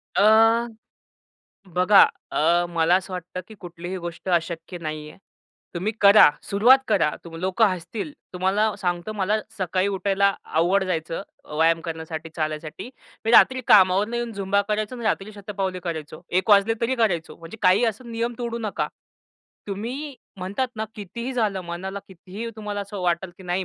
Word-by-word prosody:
अ, 225 +3 +5 1.1
बघा 185 +3 +6 0.3
अ, 170 +3 +2
मला 170 0 +2
असं 190 0 -4
वाटतं 180 0 -5
की 220 - -11
कुठलीही 175 +1 -7
गोष्ट 175 +2 -7
अशक्य 170 0 -1
नाहीये. 155 -1 -6 0.6
तुम्ही 195 +6 -1
करा 200 -2 +8
सुरुवात 235 +7 +5
करा. 190 -8 +3
तुम 165 -1 -10
लोक 185 +6 -1
हसतील. 205 - 0 0.2
तुम्हाला 195 +4 +1
सांगतो 180 +1 -2
मला 205 0 0 0.2
सकाळी 185 0 0
उठायला 200 0 +1
अवघड 180 +5 +2
जायचं 165 -1 -3 0.3
व्यायाम 165 +1 +3
करण्यासाठी, 160 -1 -6
चालायसाठी. 155 +6 -4 0.3
मी 225 - +1
रात्री 260 +2 +6
कामावरून 205 +1 +5
येऊन 240 -1 -2
झुंबा 200 0 +1
करायचो 215 +2 -1
आणि 235 - -7
रात्री 215 -1 -1
शतपावली 195 -3 -4
करायचो. 155 -2 -5
1:00 185 +4 0
वाजले 205 +2 +5
तरी 235 +3 +1
करायचो. 185 -9 0
म्हणजे 165 +6 -11
काही 195 +5 +5
असं 230 +2 -3
नियम 230 +1 -2
तोडू 235 -1 -3
नका. 215 -3 -2 0.8
तुम्ही 245 +9 -5 0.2
म्हणतात 195 +8 -2
ना, 220 - -2
कितीही 235 +5 -6
झालं, 215 -6 0
मनाला 185 +3 -5
कितीही 190 +5 -8
तुम्हाला 210 -1 -4
असं 200 0 -7
वाटलं 175 +1 0
की - - -12
नाही 180 +1 -1
195 Hz, 150 wpm, -24 LUFS, 175-215 Hz, 1.1 s, करा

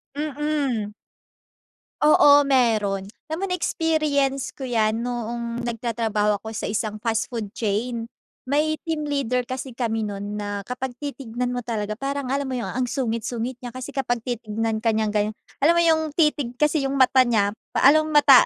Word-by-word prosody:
Mm. 290 -7 -1 1.1
Oo. 290 -1 +7
Meron 215 -7 +2 0.2
alam 315 +2 -3
mo - - +2
na-experience 305 -6 0
ko - - -14
yan 225 -2 +1
noong 235 0 -3
nagtatrabaho 225 -3 0
ako 220 +2 -8
sa - - -3
isang 215 0 -2
fast 225 -1 0
food 225 -5 -4
chain. 230 +2 -1 0.4
May 305 +3 +1
team 315 -2 -1
leader 260 -4 0
kasi 255 0 -6
kami 225 -3 -1
nun 205 +1 -5
na 205 -1 -4
kapag 250 +3 -5
titignan 250 -4 -3
mo 245 - -2
talaga 215 -3 -3
parang 275 -1 -2
alam 280 0 0
mo 260 - -3
yung 240 - -3
ang 250 0 -1
sungit-sungit 235 -1 -2
niya. 245 -1 -8
Kasi 255 +2 -6
kapag 245 -4 -1
titignan 225 -2 -2
ka 225 0 +1
niyang 215 -1 +1
ganyan, 210 0 0 0.2
alam 310 +5 +5
mo 340 - +4
yung 320 -1 +4
titig 295 -6 +2
kasi 300 +1 +2
yung 275 - -2
mata 260 -1 +5
niya 205 -4 +2 0.2
pa - - +2
alom 310 +1 +3
mata 285 -3 +8
245 Hz, 165 wpm, -24 LUFS, 220-280 Hz, 1.1 s, mata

